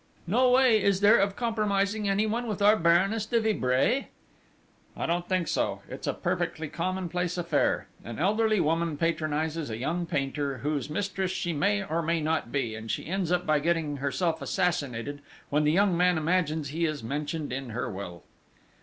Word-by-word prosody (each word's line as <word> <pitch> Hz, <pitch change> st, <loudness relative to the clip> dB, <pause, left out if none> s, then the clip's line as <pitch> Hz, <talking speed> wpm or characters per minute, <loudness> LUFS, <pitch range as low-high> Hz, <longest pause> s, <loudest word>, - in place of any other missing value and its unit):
"No 245 Hz, +8 st, +3 dB
way, 250 Hz, -4 st, +5 dB
is 195 Hz, -1 st, +2 dB
there, 210 Hz, +3 st, +6 dB
of 200 Hz, 0 st, +1 dB
compromising 210 Hz, -3 st, 0 dB
anyone 215 Hz, +4 st, 0 dB
with 210 Hz, -3 st, -3 dB
our 205 Hz, +1 st, +6 dB
Baroness 195 Hz, +5 st, +2 dB
de 235 Hz, 0 st, +2 dB
Vibray?" 220 Hz, -, +1 dB, 0.9 s
"I -, -, -2 dB
don't 175 Hz, +1 st, -1 dB
think 185 Hz, -3 st, +1 dB
so! -, -, -1 dB
It's -, -, -7 dB
a -, -, +1 dB
perfectly 160 Hz, -1 st, -2 dB
common 185 Hz, +3 st, -2 dB
place 180 Hz, +1 st, -2 dB
affair. 170 Hz, -4 st, +1 dB, 0.2 s
An 115 Hz, -, -7 dB
elderly 215 Hz, +4 st, +2 dB
woman 165 Hz, -1 st, 0 dB
patronises 160 Hz, -1 st, -1 dB
a 110 Hz, -, -4 dB
young 165 Hz, +8 st, -2 dB
painter, 140 Hz, -1 st, -2 dB
whose 150 Hz, 0 st, -1 dB
mistress 190 Hz, +3 st, -2 dB
she 175 Hz, -2 st, -2 dB
may 200 Hz, +7 st, +1 dB
or 165 Hz, -3 st, -1 dB
may 165 Hz, +1 st, 0 dB
not 155 Hz, -6 st, -1 dB
be, 130 Hz, -6 st, -1 dB
and 110 Hz, +1 st, -8 dB
she -, -, -2 dB
ends 180 Hz, 0 st, -2 dB
up 180 Hz, 0 st, +1 dB
by 155 Hz, -1 st, +3 dB
getting 160 Hz, -2 st, 0 dB
herself 160 Hz, +4 st, -1 dB
assassinated 145 Hz, -7 st, -1 dB, 0.3 s
when 150 Hz, +1 st, +2 dB
the 150 Hz, -, +4 dB
young 190 Hz, +1 st, +3 dB
man 180 Hz, 0 st, +3 dB
imagines 160 Hz, -2 st, 0 dB
he 165 Hz, +4 st, -1 dB
is 155 Hz, -5 st, -3 dB
mentioned 145 Hz, +3 st, -3 dB
in 135 Hz, -1 st, -4 dB
her 120 Hz, +3 st, -3 dB
will." 95 Hz, -6 st, -7 dB
170 Hz, 180 wpm, -28 LUFS, 150-195 Hz, 0.9 s, there